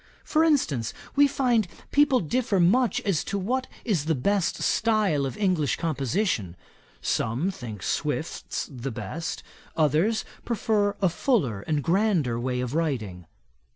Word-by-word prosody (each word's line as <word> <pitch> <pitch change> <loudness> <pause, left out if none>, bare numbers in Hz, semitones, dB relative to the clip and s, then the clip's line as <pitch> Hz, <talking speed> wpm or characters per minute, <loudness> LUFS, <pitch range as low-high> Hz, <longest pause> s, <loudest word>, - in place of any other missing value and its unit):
For 315 0 +2
instance, 155 - +1 0.2
we 285 0 +6
find 245 -7 +1 0.2
people 285 -3 +4
differ 205 +3 0
much 225 +8 +3
as 195 -6 0
to 200 - -2
what 250 +7 -1 0.2
is 180 -10 0
the 160 0 +1
best 195 +7 0
style 210 -11 +2
of 130 - -7
English 180 -8 +1
composition. 145 - -1 0.5
Some 125 +12 0
think 110 - -8
Swift's - - -2
the 130 +1 -6
best; 160 +7 -5 0.3
others 160 +9 +2 0.2
prefer 210 -3 +1
a 190 - +5
fuller 160 - 0
and 150 -3 0
grander 170 - +1
way 125 0 -1
of 125 +1 -3
writing.' 110 - -2
170 Hz, 135 wpm, -26 LUFS, 135-220 Hz, 0.5 s, we